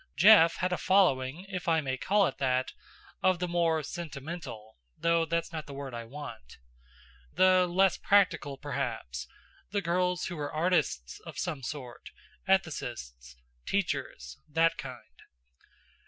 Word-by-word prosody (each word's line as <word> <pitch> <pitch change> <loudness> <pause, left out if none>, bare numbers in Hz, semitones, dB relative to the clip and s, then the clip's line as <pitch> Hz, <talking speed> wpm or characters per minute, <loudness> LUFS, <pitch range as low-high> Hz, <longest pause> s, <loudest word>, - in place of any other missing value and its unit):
Jeff 190 -5 +7
had 185 0 -1
a - - -2
following, 175 -4 +2
if 185 -3 -5
I 165 -1 +4
may 135 -4 -2
call 200 +9 +2
it - - -3
that, 130 -1 0 0.5
of 185 -1 +3
the 180 +1 -2
more 165 -2 +1
sentimental 145 - -7 0.2
though 170 0 +2
that's 170 +1 -2
not 155 -2 -5
the 140 - -8
word 135 -2 -6
I 120 -1 -5
want. 125 - -9 0.8
The 185 -1 +5
less 190 +2 +3
practical, 170 -8 +2
perhaps; 60 - -4 0.4
the 205 - 0
girls 180 +1 0
who 175 - -5
were 145 -1 -4
artists 155 - 0
of - - -8
some 140 - -3
sort, 125 -1 -7 0.4
ethicists, 120 - -2 0.3
teachers 65 +2 -2
that 165 +2 +3
kind. 125 - -10
160 Hz, 140 wpm, -30 LUFS, 130-180 Hz, 0.8 s, Jeff